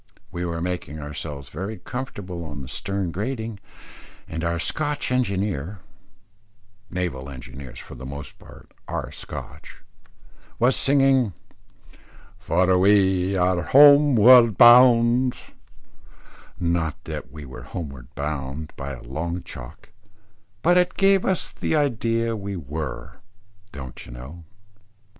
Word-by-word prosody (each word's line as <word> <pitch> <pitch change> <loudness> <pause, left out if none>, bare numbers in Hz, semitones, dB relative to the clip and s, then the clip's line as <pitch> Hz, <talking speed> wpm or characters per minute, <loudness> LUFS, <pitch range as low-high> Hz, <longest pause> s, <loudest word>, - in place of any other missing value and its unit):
We 90 0 -4
were 85 -1 -3
making 90 -4 -4
ourselves 75 -1 -7
very 95 +7 -5
comfortable 100 -9 -6
on 75 -3 -7
the - - -9
stern 95 +3 -3
gratings, 110 +2 -4 0.7
and 80 0 -5
our 85 0 0
Scotch 145 - -1
engineer 100 - -1 1.1
naval 85 -8 -4
engineers 65 0 -10
for - - -10
the 65 0 -10
most 70 +2 -7
part - - -16 0.2
are - - -4
Scotch - - -9 0.7
was 125 +3 +3
singing 135 -6 +3 1.1
"For 95 -2 +2
we 95 -1 +3
are 90 -1 +2
homeward 130 - +7
bound;" 120 +1 +6 1.2
not 85 -3 -1
that 65 - -7
we 75 0 -9
were 65 -1 -10
homeward 70 -2 -7
bound 70 +1 -4
by 70 +1 -6
a 65 - -10
long 85 +7 -4
chalk, - - -11 0.7
but 175 +2 +5
it 180 - 0
gave 195 -1 +3
us 190 - 0
the - - -2
idea 115 -5 0
we 100 -2 -5
were, 75 -4 -6 0.5
don't 65 -3 -9
you - - -12
know? 75 +8 -10
90 Hz, 120 wpm, -23 LUFS, 75-115 Hz, 1.2 s, homeward